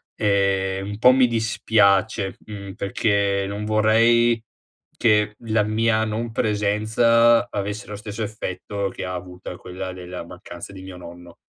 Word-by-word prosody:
Ehm, 95 Hz, -1 st, +1 dB
un 105 Hz, -, -5 dB
po' 125 Hz, -, +7 dB
mi 130 Hz, 0 st, +5 dB
dispiace, 110 Hz, -3 st, +2 dB
mhmm, 100 Hz, -2 st, -8 dB
perché 100 Hz, -1 st, 0 dB
non 100 Hz, +1 st, -4 dB
vorrei 115 Hz, +2 st, +3 dB, 0.6 s
che 105 Hz, -2 st, +3 dB
la 110 Hz, -2 st, +1 dB
mia 110 Hz, +1 st, +1 dB
non 110 Hz, +2 st, -3 dB
presenza, 110 Hz, +2 st, +3 dB
avesse 100 Hz, +1 st, -4 dB
lo 105 Hz, -, -6 dB
stesso 105 Hz, +1 st, -7 dB
effetto 100 Hz, -1 st, -4 dB
che -, -, -6 dB
ha 90 Hz, -, -4 dB
avuta 90 Hz, 0 st, -8 dB
quella 95 Hz, +1 st, -7 dB
della 90 Hz, -1 st, -7 dB
mancanza 85 Hz, +1 st, -10 dB
di 95 Hz, -, -10 dB
mio 95 Hz, -1 st, -9 dB
nonno. 85 Hz, 0 st, -12 dB
105 Hz, 140 wpm, -22 LUFS, 95-110 Hz, 0.6 s, po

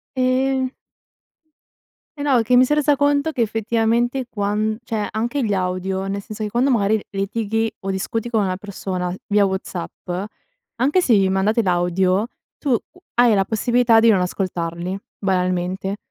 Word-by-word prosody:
Ehm 260 Hz, 0 st, +1 dB, 1.5 s
Eh 285 Hz, -, -4 dB
no, 275 Hz, -4 st, +3 dB
è 230 Hz, -, +3 dB
che 245 Hz, +2 st, +3 dB
mi 255 Hz, -, +7 dB
son 295 Hz, -, +1 dB
resa 295 Hz, -1 st, +3 dB
conto 285 Hz, +2 st, +2 dB
che 255 Hz, -, -2 dB
effettivamente 230 Hz, +3 st, 0 dB
quan 210 Hz, +1 st, -1 dB
cioè 220 Hz, -3 st, -2 dB
anche 240 Hz, +5 st, -1 dB
gli 205 Hz, -, 0 dB
audio, 190 Hz, +1 st, -2 dB
nel 200 Hz, +1 st, -3 dB
senso 215 Hz, +1 st, -7 dB
che 210 Hz, -, -2 dB
quando, 245 Hz, +5 st, +1 dB
mari, 215 Hz, -3 st, +2 dB
litighi 220 Hz, +3 st, -1 dB
o 195 Hz, -, -5 dB
discuti 215 Hz, +4 st, -2 dB
con 220 Hz, -3 st, +1 dB
una 185 Hz, -1 st, -1 dB
persona 185 Hz, -2 st, -4 dB
via 205 Hz, -1 st, +3 dB
WhatsApp, 190 Hz, -2 st, -5 dB, 0.7 s
anche 280 Hz, +9 st, +2 dB
se 255 Hz, -, +3 dB
vi 195 Hz, -1 st, +3 dB
mandate 205 Hz, +4 st, +2 dB
l'audio, 185 Hz, +2 st, +1 dB, 0.3 s
tu 265 Hz, -5 st, +1 dB, 0.4 s
hai 240 Hz, -1 st, +5 dB
la 195 Hz, -2 st, +2 dB
possibilità 230 Hz, +1 st, +3 dB
di 230 Hz, -, +5 dB
non 200 Hz, -, +4 dB
ascoltarli, 180 Hz, 0 st, -3 dB, 0.2 s
banalmente, 185 Hz, 0 st, -1 dB
215 Hz, 155 wpm, -21 LUFS, 190-240 Hz, 1.5 s, mi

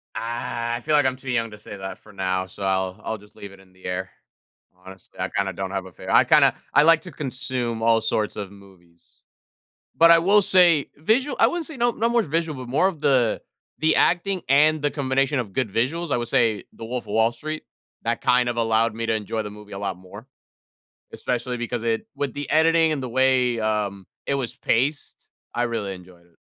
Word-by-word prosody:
Ah, 120 Hz, 0 st, -3 dB
I 120 Hz, -, -4 dB
feel 155 Hz, +2 st, +1 dB
like 145 Hz, -2 st, +4 dB
I'm 130 Hz, -, +1 dB
too 130 Hz, 0 st, -6 dB
young 115 Hz, -2 st, 0 dB
to 105 Hz, -, -10 dB
say 105 Hz, 0 st, -10 dB
that 95 Hz, -1 st, -7 dB
for 105 Hz, -, -18 dB
now, 95 Hz, -1 st, -1 dB
so 95 Hz, +2 st, -13 dB
I'll 95 Hz, +1 st, -1 dB
I'll 110 Hz, -, -3 dB
just 105 Hz, 0 st, -20 dB
leave 100 Hz, -, -10 dB
it 100 Hz, -, -15 dB
in 95 Hz, -1 st, -21 dB
the 95 Hz, -, -22 dB
air. 90 Hz, 0 st, -3 dB, 0.7 s
Honestly, 95 Hz, -1 st, -14 dB
I -, -, -1 dB
kinda 95 Hz, -1 st, -1 dB
don't 95 Hz, +1 st, -4 dB
have 95 Hz, -1 st, -3 dB
a 95 Hz, -, -11 dB
fave -, -, -10 dB
I -, -, +6 dB
kinda -, -, +5 dB, 0.2 s
I 145 Hz, -, +6 dB
like 165 Hz, 0 st, +5 dB
to 180 Hz, +1 st, -9 dB
consume 130 Hz, -4 st, -2 dB
all 115 Hz, 0 st, +4 dB
sorts 110 Hz, -1 st, -1 dB
of 100 Hz, -2 st, -6 dB
movies. 95 Hz, -4 st, -20 dB, 0.7 s
But 165 Hz, +1 st, +6 dB
I 170 Hz, -, +8 dB
will 200 Hz, +5 st, +4 dB
say 175 Hz, -6 st, +4 dB
visual 230 Hz, -, +1 dB
I -, -, +7 dB
wouldn't 345 Hz, -3 st, -3 dB
say 315 Hz, -, -9 dB
no 240 Hz, 0 st, +2 dB
no 230 Hz, +1 st, 0 dB
more 235 Hz, -2 st, +2 dB
visual, 155 Hz, -3 st, -2 dB
but -, -, -11 dB
more 150 Hz, +9 st, +3 dB
of 165 Hz, -6 st, -5 dB
the 130 Hz, -6 st, +2 dB, 0.4 s
the 160 Hz, 0 st, +3 dB
acting 180 Hz, +1 st, +2 dB
and 150 Hz, +2 st, +4 dB
the 145 Hz, -, 0 dB
combination 135 Hz, 0 st, 0 dB
of 105 Hz, -6 st, -5 dB
good 125 Hz, -6 st, -1 dB
visuals, 150 Hz, +7 st, -1 dB
I -, -, +2 dB
would 120 Hz, -, -3 dB
say, 110 Hz, -4 st, +1 dB
"The 115 Hz, -, -9 dB
Wolf 125 Hz, +1 st, -4 dB
of 105 Hz, -, -7 dB
Wall 110 Hz, +1 st, +3 dB
Street," 155 Hz, +5 st, -6 dB, 0.4 s
that -, -, -1 dB
kind 125 Hz, 0 st, +3 dB
of 120 Hz, -, -1 dB
allowed 115 Hz, 0 st, +2 dB
me 115 Hz, 0 st, -4 dB
to 110 Hz, -, +1 dB
enjoy 110 Hz, +1 st, -3 dB
the 105 Hz, -, -6 dB
movie 105 Hz, 0 st, -13 dB
a 100 Hz, -, -6 dB
lot 100 Hz, -3 st, -3 dB
more. 100 Hz, +6 st, -13 dB, 0.9 s
Especially 125 Hz, 0 st, -3 dB
because 120 Hz, 0 st, -4 dB
it 115 Hz, -1 st, -1 dB
with 140 Hz, -3 st, -2 dB
the 145 Hz, 0 st, -5 dB
editing 160 Hz, 0 st, +4 dB
and 140 Hz, -, -3 dB
the 130 Hz, -, -4 dB
way, 130 Hz, -1 st, +2 dB
um, 105 Hz, -3 st, -2 dB, 0.2 s
it 140 Hz, -, +1 dB
was 125 Hz, -4 st, -3 dB
paced, 140 Hz, +6 st, -1 dB, 0.3 s
I 120 Hz, -, 0 dB
really 110 Hz, -5 st, -3 dB
enjoyed 90 Hz, -1 st, -15 dB
it. 85 Hz, -, -30 dB
120 Hz, 225 wpm, -23 LUFS, 105-145 Hz, 0.9 s, I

